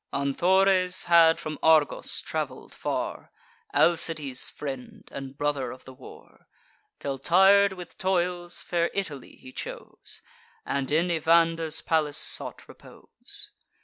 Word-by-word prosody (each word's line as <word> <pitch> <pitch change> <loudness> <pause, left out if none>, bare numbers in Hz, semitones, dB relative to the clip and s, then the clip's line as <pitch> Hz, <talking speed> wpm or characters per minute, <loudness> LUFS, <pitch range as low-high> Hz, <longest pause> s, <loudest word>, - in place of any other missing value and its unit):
Anthores 185 +6 +2
had 165 -1 +5
from 155 -2 -6
Argos 160 -2 +3
travel'd - - -5
far, - - -4 0.4
Alcides' 160 -6 +2
friend, 135 -3 -8
and 135 0 -8
brother 145 -4 -1
of 130 +1 -11
the 130 - -11
war; 130 0 -15 0.5
Till, 135 -1 -4
tir'd 195 +5 +5
with 180 -2 -11
toils, 175 -2 -1
fair 170 -1 0
Italy 150 -9 -5
he 130 - -13
chose, - - -7 0.4
And 140 -1 -2
in 165 +4 +2
Evander's 165 -1 +2
palace 155 -3 0
sought - - 0
repose. - - -12
160 Hz, 115 wpm, -26 LUFS, 140-175 Hz, 0.5 s, had